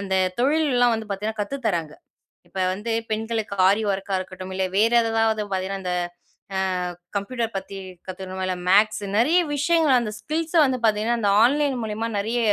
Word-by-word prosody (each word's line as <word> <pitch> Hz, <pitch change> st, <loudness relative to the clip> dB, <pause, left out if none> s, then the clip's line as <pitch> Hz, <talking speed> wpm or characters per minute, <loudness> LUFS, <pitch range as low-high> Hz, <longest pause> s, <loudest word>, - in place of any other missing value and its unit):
அந்த 195 Hz, -1 st, -2 dB, 0.2 s
தொழில்லாம் 260 Hz, -3 st, +3 dB
வந்து 220 Hz, -1 st, -5 dB
பார்த்தீங்கனா 210 Hz, +2 st, -3 dB
கத்துத்தறாங்க. 205 Hz, -, -2 dB, 0.5 s
இப்ப -, -, -9 dB, 0.2 s
வந்து 210 Hz, +4 st, -5 dB, 0.2 s
பெண்களுக்கு 220 Hz, -1 st, -2 dB
ஆரி 200 Hz, +3 st, +3 dB
ஒர்க்கா 195 Hz, 0 st, -2 dB
இருக்கட்டும், 185 Hz, 0 st, -7 dB
இல்ல 190 Hz, 0 st, 0 dB
வேறு 225 Hz, +3 st, +4 dB
ஏதாவது 225 Hz, -1 st, +1 dB
பார்த்தீங்கன்னா 190 Hz, +1 st, -2 dB
இந்த 180 Hz, -, -1 dB, 0.6 s
அ -, -, +1 dB, 0.6 s
கம்ப்யூட்டர் 225 Hz, +2 st, -2 dB
பத்தி 195 Hz, +1 st, -7 dB, 0.3 s
கத்துக்கணுமா, 190 Hz, 0 st, -6 dB
இல்லை 185 Hz, -, -2 dB
மேக்ஸ் 210 Hz, +2 st, +4 dB
நெறைய 305 Hz, +10 st, +4 dB, 0.2 s
விஷயங்கள் 295 Hz, -2 st, +3 dB
அந்த 215 Hz, -3 st, -3 dB
ஸ்கில்ஸை 320 Hz, +3 st, 0 dB
வந்து 260 Hz, -2 st, 0 dB
பார்த்தீங்கன்னா 220 Hz, +2 st, +2 dB
அந்த 205 Hz, -3 st, +2 dB
ஆன்லைன் 285 Hz, +1 st, +2 dB
மூலியமா 220 Hz, +1 st, -3 dB
நிறைய 225 Hz, +4 st, -1 dB
220 Hz, 155 wpm, -23 LUFS, 195-245 Hz, 0.6 s, வேறு